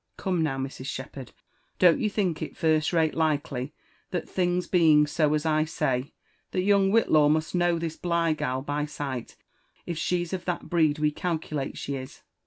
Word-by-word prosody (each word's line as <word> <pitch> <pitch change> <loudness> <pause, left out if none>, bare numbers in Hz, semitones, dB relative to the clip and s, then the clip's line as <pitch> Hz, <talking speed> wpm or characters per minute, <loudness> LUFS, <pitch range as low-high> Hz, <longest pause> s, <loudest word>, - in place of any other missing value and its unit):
Come 180 -3 -1
Qow, 140 -4 -1
Mrs* 135 0 -5
Shepherd 130 -1 -7 0.3
» - - -42
don't 175 -3 +5
you 215 - +1
think 190 -6 -1
it - - -6
first 155 -1 +2
rate 160 -3 +2
likely 145 -4 -1 0.4
that 175 -3 -3
things 180 -1 0
being 155 -4 +5
so 150 0 +1
as 150 +1 -2
I 155 -1 +3
say, 135 -3 -2 0.3
that 185 - -1
young 200 -1 +4
Whillaw 155 -9 +4
must 155 +1 0
know 175 -1 +2
this 165 -1 -4
Bligh 170 -2 +1
gal 130 -3 -2
by 145 +1 -2
sight 140 -4 -5 0.5
if 170 -2 -4
she's 175 +1 -1
of 180 -2 -4
that 180 -1 -3
breed 160 -3 +3
we 150 0 +1
calculate 155 -4 -3
she 140 -1 -4
is 130 +1 -10
155 Hz, 185 wpm, -27 LUFS, 145-175 Hz, 0.5 s, don't